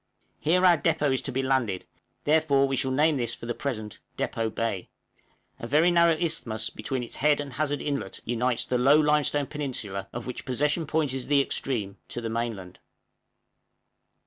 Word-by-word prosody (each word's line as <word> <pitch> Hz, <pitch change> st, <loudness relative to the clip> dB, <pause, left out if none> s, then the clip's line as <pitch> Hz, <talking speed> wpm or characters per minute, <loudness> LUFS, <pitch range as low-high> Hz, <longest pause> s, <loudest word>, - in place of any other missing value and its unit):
Here 180 Hz, +4 st, +3 dB
our 175 Hz, -3 st, +6 dB
depôt 150 Hz, -4 st, +2 dB
is 130 Hz, -, 0 dB
to 135 Hz, -, -3 dB
be 135 Hz, +1 st, -1 dB
landed, 130 Hz, -8 st, 0 dB, 0.4 s
therefore 145 Hz, -3 st, +3 dB
we 135 Hz, -, -1 dB
shall 130 Hz, -, 0 dB
name 150 Hz, +3 st, +3 dB
this 120 Hz, -2 st, -2 dB
for -, -, -9 dB
the 120 Hz, -, -2 dB
present 110 Hz, -6 st, -4 dB, 0.2 s
Depôt 115 Hz, -1 st, -2 dB
Bay; 110 Hz, -6 st, -2 dB, 0.7 s
a 115 Hz, -, -5 dB
very 155 Hz, +7 st, +4 dB
narrow 170 Hz, -2 st, +4 dB
isthmus 140 Hz, -11 st, -1 dB
between 130 Hz, -2 st, -3 dB
its 120 Hz, -, -6 dB
head 150 Hz, 0 st, +3 dB
and 140 Hz, -2 st, -5 dB
Hazard 145 Hz, +2 st, -1 dB
Inlet 140 Hz, -2 st, -3 dB
unites 120 Hz, +1 st, 0 dB
the 125 Hz, -, 0 dB
low 140 Hz, +4 st, +6 dB
limestone 150 Hz, -1 st, +2 dB
peninsula, 125 Hz, -10 st, -4 dB
of 120 Hz, 0 st, -6 dB
which 125 Hz, -, -6 dB
Possession 150 Hz, +5 st, 0 dB
Point 155 Hz, -3 st, 0 dB
is 130 Hz, -1 st, -4 dB
the 145 Hz, 0 st, +4 dB
extreme, 120 Hz, -7 st, -1 dB
to -, -, -5 dB
the 115 Hz, -1 st, -4 dB
mainland. 115 Hz, -6 st, -4 dB
135 Hz, 175 wpm, -27 LUFS, 120-150 Hz, 0.7 s, our